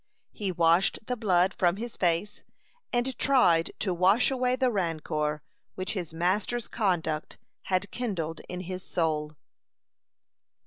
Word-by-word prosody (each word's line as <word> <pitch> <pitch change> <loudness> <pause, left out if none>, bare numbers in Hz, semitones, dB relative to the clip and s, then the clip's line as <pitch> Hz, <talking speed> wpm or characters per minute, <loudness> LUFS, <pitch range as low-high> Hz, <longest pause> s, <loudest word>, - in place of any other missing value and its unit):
He 200 -3 -2
washed 170 +2 +3
the 250 - -2
blood 190 -4 +2
from 175 -1 +2
his 230 +3 -6
face, 175 +3 0 0.5
and 245 +1 0
tried 180 -12 +4
to 190 - 0
wash 190 +9 +4
away 255 -1 +1
the 255 -1 +1
rancor 155 -5 -1 0.3
which 185 0 -3
his 180 -6 -4
master's 190 +8 0
conduct 170 -8 -1 0.3
had 185 +1 0
kindled 175 -10 -3
in 180 0 -4
his 185 +1 -5
soul. 155 -4 -1
185 Hz, 130 wpm, -28 LUFS, 165-220 Hz, 0.5 s, tried